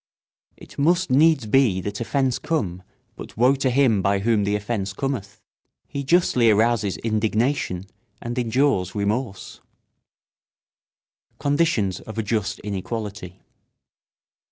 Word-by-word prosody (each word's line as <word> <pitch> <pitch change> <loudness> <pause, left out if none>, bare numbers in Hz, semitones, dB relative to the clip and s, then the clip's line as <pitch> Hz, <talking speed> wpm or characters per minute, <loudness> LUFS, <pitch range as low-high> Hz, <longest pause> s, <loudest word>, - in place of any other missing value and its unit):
It - - -13
must 170 +2 +2
needs 150 -1 +4
be 110 -4 +3
that 100 +3 -5
offence 130 +1 0
come, 95 - -2 0.3
but - - -11
woe 125 +4 +5
to 135 -1 +1
him 125 -6 +3
by 100 +1 +2
whom 105 0 +1
the 100 +1 0
offence 100 -2 -3
cometh. 105 -4 -4 0.5
He 140 - -5
justly 135 -6 +3
arouses 110 -4 +2
indignation 110 - -1 0.3
and 120 0 -5
endures 120 -6 +1
remorse. 105 0 -3 1.8
[Sidenote: - - -44
Conditions 140 - +1
of 110 - -10
a 110 - 0
just 105 -1 -1
inequality. 100 -2 -6
110 Hz, 120 wpm, -23 LUFS, 100-135 Hz, 1.8 s, woe